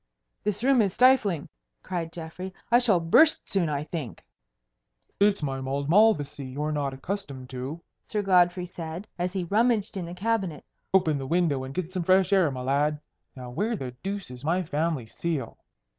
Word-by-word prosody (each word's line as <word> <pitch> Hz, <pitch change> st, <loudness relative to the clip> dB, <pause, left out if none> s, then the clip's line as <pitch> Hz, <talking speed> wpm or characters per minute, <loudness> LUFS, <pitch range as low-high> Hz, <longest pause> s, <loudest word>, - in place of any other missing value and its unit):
"This 210 Hz, +1 st, -1 dB
room 265 Hz, -2 st, +5 dB
is 195 Hz, -4 st, +1 dB
stifling," 210 Hz, -, +4 dB, 0.4 s
cried 170 Hz, -3 st, -3 dB
Geoffrey. 175 Hz, +3 st, -7 dB, 0.2 s
"I 240 Hz, -, +7 dB
shall 220 Hz, -8 st, +3 dB
burst 290 Hz, -, +4 dB
soon, 180 Hz, -5 st, +1 dB
I 145 Hz, -1 st, -1 dB
think." 150 Hz, -5 st, -6 dB, 0.9 s
"It's 200 Hz, -4 st, +3 dB
my 135 Hz, -2 st, -2 dB
mulled 140 Hz, +3 st, -2 dB
Malvoisie 180 Hz, -9 st, +3 dB
you're 145 Hz, +4 st, -3 dB
not 145 Hz, -2 st, -1 dB
accustomed 135 Hz, -5 st, -6 dB
to," 130 Hz, +6 st, -5 dB, 0.3 s
Sir 210 Hz, -1 st, -1 dB
Godfrey 180 Hz, -1 st, +3 dB
said, 170 Hz, +2 st, -7 dB
as 180 Hz, +1 st, -1 dB
he 190 Hz, -2 st, -1 dB
rummaged 215 Hz, +3 st, +1 dB
in 180 Hz, -3 st, -4 dB
the 175 Hz, -, -7 dB
cabinet. 195 Hz, -6 st, -1 dB, 0.3 s
"Open 165 Hz, -6 st, +3 dB
the 135 Hz, -, -5 dB
window 160 Hz, -5 st, +1 dB
and 130 Hz, -, -6 dB
get 185 Hz, 0 st, -3 dB
some 185 Hz, -, -1 dB
fresh 185 Hz, +3 st, +3 dB
air, 185 Hz, -5 st, +4 dB
my 130 Hz, -2 st, -5 dB
lad. 145 Hz, +3 st, +1 dB, 0.4 s
Now 125 Hz, -2 st, -8 dB
where 210 Hz, -, -1 dB
the 130 Hz, -10 st, -5 dB
deuce 195 Hz, -6 st, -4 dB
is 125 Hz, +1 st, -10 dB
my 175 Hz, +4 st, +1 dB
family 155 Hz, -4 st, -1 dB
seal?" 140 Hz, +1 st, -4 dB
170 Hz, 175 wpm, -27 LUFS, 145-195 Hz, 0.9 s, I